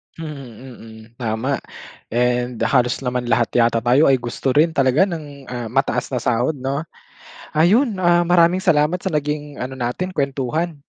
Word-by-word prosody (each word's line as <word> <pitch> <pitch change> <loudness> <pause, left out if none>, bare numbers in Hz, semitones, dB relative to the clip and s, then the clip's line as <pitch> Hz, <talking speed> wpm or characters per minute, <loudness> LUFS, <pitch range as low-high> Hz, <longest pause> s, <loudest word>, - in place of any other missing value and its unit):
Mm, 160 -2 -6 0.5
mm, 110 -1 -12 0.2
tama. 120 +4 -1 0.5
And 125 0 0
halos 125 -2 +2
naman 125 -2 -2
lahat 115 -1 +2
yata 115 -1 +3
tayo 125 +6 +4
ay 135 - +4
gusto 120 +2 -3
rin 160 +4 +3
talaga 135 +6 +3
ng, 145 -6 -8
ah, 120 -2 -5
mataas - - 0
na - - 0
sahod 125 +6 0
'no? 135 +3 -2 0.7
Ayun, 205 - +3
ah, 175 0 +4
maraming 175 +1 +4
salamat 165 -1 +2
sa 190 -3 -3
naging 150 -1 -3
ano 130 +1 -6
natin, 125 +10 -2
kwentuhan. 140 +2 -2
140 Hz, 155 wpm, -20 LUFS, 125-160 Hz, 0.7 s, tayo